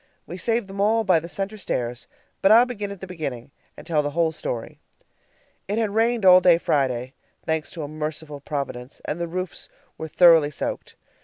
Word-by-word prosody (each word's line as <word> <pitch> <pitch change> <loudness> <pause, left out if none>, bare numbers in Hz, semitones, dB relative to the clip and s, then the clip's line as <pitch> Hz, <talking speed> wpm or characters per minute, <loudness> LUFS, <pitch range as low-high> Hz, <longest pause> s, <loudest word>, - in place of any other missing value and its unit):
We 175 - -8
saved 230 +5 -1
them 195 0 -5
all 220 +2 +3
by 185 -5 +4
the 170 +2 -9
center 200 +4 -5
stairs 120 -8 -3 0.3
but 195 - +5
I'll 235 +3 +8
begin 210 -5 -5
at 200 -2 -9
the - - -5
beginning, 140 -9 -6 0.3
and - - -11
tell 155 -3 +1
the 145 - -2
whole 165 -1 +3
story. 120 -6 -5 0.9
It 205 +3 -2
had 220 -3 0
rained 225 -1 +1
all 185 0 +8
day 175 -2 +6
Friday, 130 -5 -1 0.3
thanks 160 -1 -1
to 165 - -5
a - - -4
merciful 155 -1 -6
Providence, 140 -3 -5
and 165 +3 -3
the 170 - -1
roofs 185 +2 -6 0.3
were 160 - -4
thoroughly 165 -2 +6
soaked. 150 - -5
170 Hz, 190 wpm, -23 LUFS, 150-200 Hz, 0.9 s, I'll